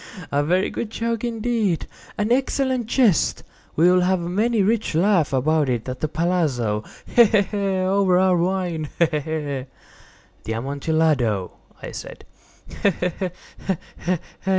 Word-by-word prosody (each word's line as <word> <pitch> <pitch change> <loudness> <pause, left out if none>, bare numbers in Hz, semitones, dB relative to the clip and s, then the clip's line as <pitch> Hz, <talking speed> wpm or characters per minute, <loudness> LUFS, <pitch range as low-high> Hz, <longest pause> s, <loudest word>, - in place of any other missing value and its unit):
—he! - - -10
he!—a 145 -2 -1
very 180 +5 +1
good 230 - -4
joke 230 0 -2
indeed—an 225 -2 -2
excellent 260 -2 +1
jest. 235 - +2 0.3
We 165 +3 +4
will 180 0 +5
have 185 +1 +2
many 205 +6 +1
a - - +2
rich 215 -5 0
laugh 175 -3 +3
about 145 +2 +2
it 120 -2 -2
at 130 0 -5
the 155 - -1
palazzo—he! 150 - +1
he! 210 -2 +4
he!—over 195 -2 +1
our 185 0 +4
wine—he! 175 -3 0
he! 155 -2 -1
he!" 145 -3 -3 0.8
"The 110 - -2
Amontillado!" 135 - 0 0.3
I - - -6
said. - - -9
180 Hz, 125 wpm, -22 LUFS, 150-210 Hz, 0.8 s, will